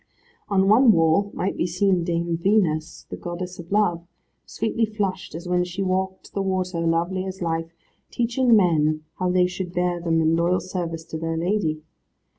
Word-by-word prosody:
On 195 -1 +3
one 225 +4 +6
wall 165 +4 +3
might 190 - -1
be 170 - 0
seen 180 0 +1
Dame 170 0 -1
Venus, 170 -4 0
the - - -3
goddess 180 +1 -6
of 175 +1 -10
Love, 175 -5 +1 0.4
sweetly 225 +1 -1
flushed 200 -6 -2
as 170 +2 -7
when 180 0 +2
she 180 +2 -4
walked 190 0 -2
the 200 - -1
water, 185 -2 -1
lovely 170 +3 0
as 190 0 -6
life, 165 -1 -2 0.4
teaching 240 0 +2
men 155 -5 +2 0.2
how 185 0 +1
they 180 0 +3
should 180 0 -4
bear 175 -1 0
them 165 -1 +1
in 160 0 +3
loyal 175 +2 +2
service 170 -3 -5
to 160 - -6
their 165 0 -2
lady. 165 -3 -1
180 Hz, 175 wpm, -23 LUFS, 165-190 Hz, 0.4 s, one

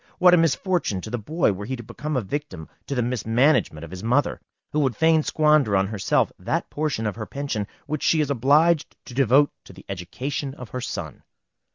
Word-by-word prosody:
What 180 0 +6
a - - +7
misfortune 165 - +1
to 110 - -8
the 120 - -2
boy, 155 +5 +1
were 100 +2 -7
he 130 - -2
to 120 - -9
become 150 +6 -4
a 125 - -1
victim 120 - -5 0.2
to 140 - -3
the 125 - +1
mismanagement 120 - +1
of 85 - -9
his 95 0 -8
mother, 125 +6 +1 0.3
who 150 - 0
would 135 -5 +1
fain 160 0 +4
squander 150 -9 +3
on 95 - +2
herself 100 -1 +1
that - - -2
portion 145 -7 -2
of 105 0 -2
her 110 -2 -5
pension 140 -8 -3 0.2
which 150 0 -3
she 160 - +3
is 145 -2 +1
obliged 145 +5 +3
to 125 - -10
devote 135 +3 +4
to - - -14
the - - -15
education 130 - -4
of 125 -3 -10
her 125 - -5
son! - - -5
130 Hz, 210 wpm, -24 LUFS, 110-150 Hz, 0.3 s, a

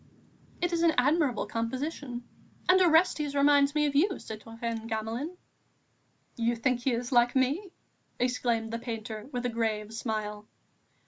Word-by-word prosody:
"It 350 0 0
is 335 - +1
an 335 -2 +4
admirable 280 -3 +2
composition.... 250 +2 -3 0.4
And 370 +1 +6
Orestes 320 -4 +3
reminds 285 0 +4
me 300 0 +3
of 290 - 0
you, 365 +7 +3
citoyen 225 +1 -6
Gamelin." 230 +10 -3 1.0
"You 235 0 +1
think 245 +2 +1
he 260 +2 0
is 240 +2 -3
like 240 0 +4
me?" 290 +9 +1 0.5
exclaimed 235 -2 0
the 230 - -2
painter, 225 -1 -6
with 245 -1 -3
a - - +1
grave 220 -2 -2
smile. 215 -2 -4
245 Hz, 140 wpm, -29 LUFS, 225-290 Hz, 1.0 s, And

